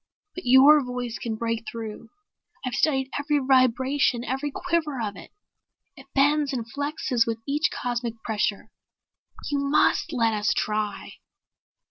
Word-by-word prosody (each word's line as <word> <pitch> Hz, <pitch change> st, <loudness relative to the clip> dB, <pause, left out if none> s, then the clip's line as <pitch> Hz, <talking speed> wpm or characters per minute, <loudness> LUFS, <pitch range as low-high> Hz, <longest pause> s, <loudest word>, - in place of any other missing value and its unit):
But 360 Hz, -, -8 dB
your 275 Hz, +4 st, +7 dB
voice 250 Hz, -2 st, -5 dB
can 225 Hz, -2 st, -3 dB
break 230 Hz, 0 st, -3 dB
through. 225 Hz, -1 st, -7 dB, 0.6 s
I've 255 Hz, -, -3 dB
studied 270 Hz, -3 st, +1 dB
every 295 Hz, +1 st, +1 dB
vibration, 260 Hz, -1 st, +2 dB
every 270 Hz, +5 st, -2 dB
quiver 315 Hz, -3 st, -2 dB
of 210 Hz, -3 st, -3 dB
it. -, -, -12 dB, 0.6 s
It 270 Hz, -2 st, -15 dB
bends 290 Hz, +1 st, +3 dB
and 240 Hz, -3 st, -3 dB
flexes 280 Hz, -2 st, -1 dB
with 230 Hz, -1 st, -1 dB
each 295 Hz, +3 st, +1 dB
cosmic 240 Hz, -2 st, -3 dB
pressure. 215 Hz, -1 st, -2 dB, 0.8 s
You 285 Hz, -, +1 dB
must 280 Hz, +3 st, +2 dB
let 230 Hz, -5 st, +1 dB
us 210 Hz, 0 st, 0 dB
try." 210 Hz, -2 st, -3 dB
255 Hz, 135 wpm, -25 LUFS, 230-285 Hz, 0.8 s, your